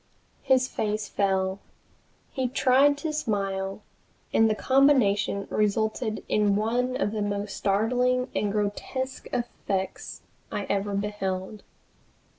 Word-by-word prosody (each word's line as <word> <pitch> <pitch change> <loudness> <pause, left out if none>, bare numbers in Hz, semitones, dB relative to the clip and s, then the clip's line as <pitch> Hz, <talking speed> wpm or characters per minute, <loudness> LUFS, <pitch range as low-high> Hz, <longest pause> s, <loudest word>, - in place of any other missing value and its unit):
His 260 -1 +3
face 210 -2 -2
fell. 190 -1 0 0.7
He 260 -2 -1
tried 270 +3 +4
to 305 +1 -3
smile, 195 -7 -2 0.5
and 225 0 +5
the 215 - +1
combination 230 -8 +3
resulted 215 +1 0
in 205 -1 +2
one 245 +4 0
of 210 - 0
the 215 -1 -2
most 205 0 -2
startling 250 +5 +1
and 205 - 0
grotesque 215 +6 -3
effects 195 -5 -3 0.3
I 205 - -2
ever 200 0 -1
beheld. 200 0 -3
210 Hz, 110 wpm, -26 LUFS, 200-250 Hz, 0.7 s, and